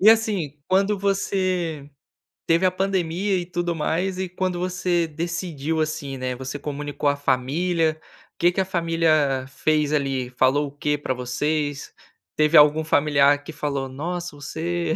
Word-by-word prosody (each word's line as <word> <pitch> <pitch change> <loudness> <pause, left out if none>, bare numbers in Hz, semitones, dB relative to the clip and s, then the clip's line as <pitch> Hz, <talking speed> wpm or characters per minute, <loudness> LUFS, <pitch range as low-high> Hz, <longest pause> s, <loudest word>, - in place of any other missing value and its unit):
e 210 - +6
assim, 200 -10 +1
quando 195 +2 +2
você 185 -6 -1 0.6
teve 170 +3 +3
a - - +1
pandemia 190 0 0
e 175 - -3
tudo 175 -1 -2
mais, 180 +4 -1
e 190 - -1
quando 180 0 -2
você 180 -1 0
decidiu, 160 -1 -3
assim, 145 -3 -3
né, 130 0 -3
você 130 +3 -6
comunicou 145 0 -2
à 145 - +1
família? 155 +5 0 0.4
O - - -71
que 175 +1 +4
que 190 - 0
a - - -1
família 165 -6 +1
fez, 150 +2 0
ali, 135 -3 0
falou 130 +3 +2
o 140 - -10
quê 145 +1 -1
para 130 - -2
vocês? 145 +4 -2 0.4
Teve 155 +1 +4
algum 150 +1 +6
familiar 145 -2 +3
que 160 - -8
falou: 140 -3 -3
"Nossa, 170 +4 -4
você" 160 +3 -2
155 Hz, 155 wpm, -23 LUFS, 145-175 Hz, 0.6 s, e